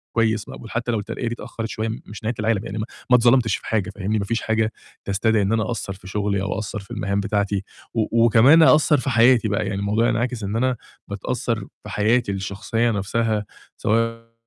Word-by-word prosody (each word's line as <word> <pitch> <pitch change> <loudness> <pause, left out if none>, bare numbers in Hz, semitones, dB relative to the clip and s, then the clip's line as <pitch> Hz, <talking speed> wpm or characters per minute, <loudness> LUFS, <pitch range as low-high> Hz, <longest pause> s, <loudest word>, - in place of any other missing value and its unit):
كويس 110 -2 +1
مقبول 115 - -9
حتى 120 0 -1
لو 115 - 0
الترقية 115 +3 -4
دي 115 - -1
اتأخرت 115 -1 -6
شوية 110 0 -3 0.2
مش 105 - -10
نهاية 115 +3 -1
العالم، 110 -1 0
يعني 105 -1 -5
ما 105 - -2 0.2
ما 125 - +7
اتظلمتش 120 -3 +4
في - - -12
حاجة، 105 -2 0
فاهمني، 105 +2 -2
ما 100 - -2
فيش 115 +3 -1
حاجة 110 0 0 0.3
تستدعي 105 +2 +1
إن 100 +2 +1
أنا 110 -1 +2
أقصَّر 110 -3 -4
في 95 -1 -14
شغلي 100 0 -1
أو 95 -1 -2
أقصَّر 110 0 -4
في 100 - -14
المهام 100 0 -1
بتاعتي 100 -1 -1 0.3
و 115 +1 +2
وكمان 125 +8 +7
أقصَّر 155 -1 +5
في 135 +1 -2
حياتي 120 -1 +5
بقى، 105 0 0
يعني 100 -1 -2
الموضوع 105 +4 +1
هينعكس 120 -1 -1
إن 100 +2 -3
أنا 125 +1 +1 0.3
باتأثر 115 +4 -2 0.3
في - - -9
حياتي 110 +1 +1
الشخصية 100 +4 -1
نفْسها 105 +1 -1 0.3
سواء 115 +1 -1
110 Hz, 205 wpm, -22 LUFS, 100-115 Hz, 0.3 s, ما